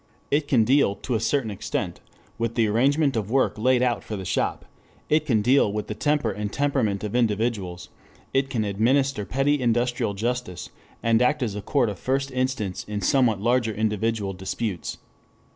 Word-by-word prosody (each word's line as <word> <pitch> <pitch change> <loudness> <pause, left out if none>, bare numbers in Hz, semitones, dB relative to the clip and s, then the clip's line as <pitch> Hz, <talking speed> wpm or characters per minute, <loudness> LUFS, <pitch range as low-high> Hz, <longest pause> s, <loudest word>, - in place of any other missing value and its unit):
It 145 0 +2
can 120 -6 +4
deal 125 -4 +3
to 125 - -4
a 110 - +1
certain 115 0 0
extent 100 - -3 0.4
with 115 0 -1
the 115 - +3
arrangement 135 +6 +2
of 105 -3 -2
work 135 +2 +2
laid 125 +2 +3
out 120 -3 0
for 110 - -5
the 95 -2 -6
shop, - - -1 0.4
it 155 0 +2
can 110 -6 +2
deal 125 -3 +4
with 105 0 -3
the - - -4
temper 145 -1 0
and 105 0 -4
temperament 130 -8 0
of 105 +2 -3
individuals, 105 -6 -1 0.4
it 135 0 +1
can 115 -5 -1
administer 115 +3 +1
petty 135 +4 +1
industrial 120 -3 0
justice, 100 - -3 0.3
and 115 0 +3
act 140 +2 +2
as 110 -4 -2
a 105 - -5
court 130 +2 +1
of 100 -4 -5
first 135 +1 -1
instance 130 -7 -2
in 105 -1 -4
somewhat 120 -8 +2
larger 120 -1 +1
individual 110 -1 -1
disputes. 95 +1 -4
115 Hz, 175 wpm, -24 LUFS, 105-130 Hz, 0.4 s, can